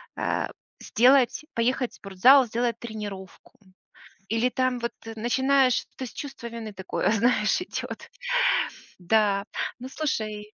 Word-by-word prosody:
а, - - -1 0.3
сделать 255 +4 +3
поехать 250 +2 0
в - - -16
спортзал, 245 +8 +5
сделать 235 0 -1
тренировку". 205 -4 -8 0.8
Или 225 +3 +2
там 255 -1 0
вот 235 0 -3 0.2
начинаешь, 260 +2 +2
то 260 - -4
есть - - -11
чувство 275 -4 -6
вины 230 -2 -7
такое, 190 +2 -1
знаешь, 220 - +2
идет. - - -6 0.9
Да. 200 +2 +2 0.4
Ну, 255 - -7
слушай 215 -8 -3
235 Hz, 120 wpm, -26 LUFS, 210-255 Hz, 0.9 s, спортзал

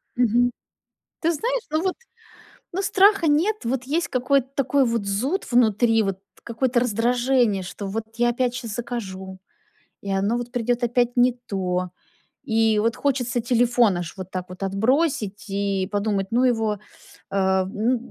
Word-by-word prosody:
Мгм. 245 0 +3 0.7
Ты 335 +1 +2
знаешь, 480 +9 -1
ну, 310 +2 0
вот, 375 -1 0 0.8
ну, 385 - -1
страха 400 -3 +4
нет. 330 +9 +3
Вот, 250 +2 -1
есть 330 +4 0
какой-то 260 +1 +1
такой 275 0 +2
вот 230 -3 -1
зуд 255 - -1
внутри, 225 -1 +3
вот, 195 -1 -2 0.2
какое-то 240 +1 0
раздражение, 240 -2 +1
что, 190 +2 -6
вот, 220 +3 -3
я 240 +1 +2
опять 245 0 0
сейчас 230 -4 -5
закажу, 190 -6 -6 0.6
и 200 - -7
оно, 200 +5 +1
вот, 245 0 -5
придет 245 0 -1
опять 240 +1 +1
не 245 +1 +5 0.2
то. 180 -2 -1 0.5
И, 225 -4 +2
вот, 225 +1 +1
хочется 250 -4 0
телефон 240 -4 +3
аж, 175 -1 -5
вот 185 0 -7
так 185 -1 -4
вот, 185 +1 -8
отбросить, 215 - 0
и 195 -1 -1
подумать: 205 -1 0
"Ну 245 +2 +3
его, 220 -4 +1 0.5
э, 190 -1 +2
ну 220 +6 0
235 Hz, 150 wpm, -23 LUFS, 200-255 Hz, 0.8 s, не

